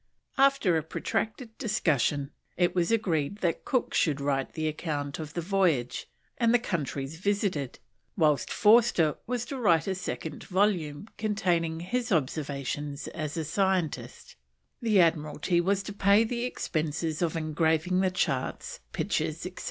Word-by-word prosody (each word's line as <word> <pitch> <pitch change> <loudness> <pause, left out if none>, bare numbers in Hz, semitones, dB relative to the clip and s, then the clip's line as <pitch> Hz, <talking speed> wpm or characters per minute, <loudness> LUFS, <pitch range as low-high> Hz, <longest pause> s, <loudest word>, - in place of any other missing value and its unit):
After 275 -11 +4
a - - +1
protracted 220 - -3
discussion, 150 - +1 0.3
it 175 0 +2
was 175 +2 +1
agreed 185 -6 0
that 170 -3 -1
Cook 255 - 0
should 150 -4 +2
write 140 -1 -1
the 155 -1 -2
account 145 -3 -3
of 155 -1 -7
the 170 - -1
voyage 170 -9 +1 0.3
and 230 -2 +4
the 245 - +6
countries 150 - -3
visited; 195 - -1 0.4
whilst 150 -7 +2
Forster 210 -8 +4
was 245 -1 -2
to 275 - -5
write 170 -8 +3
a 195 - 0
second 180 -4 -5
volume 185 -5 0
containing 175 -6 0
his 240 +6 -2
observations 145 -2 -2
as 155 +1 -5
a 160 - -1
scientist; 185 0 -1 0.5
the 220 -4 +3
Admiralty 165 +1 +2
was 195 +2 +1
to 205 - -6
pay 200 +2 +4
the 235 +1 -2
expenses 155 -7 -2
of 165 -1 0
engraving 160 +3 +1
the 190 - +3
charts, 480 - -2
pictures, - - -1
etc. - - -7
170 Hz, 145 wpm, -28 LUFS, 150-205 Hz, 0.5 s, the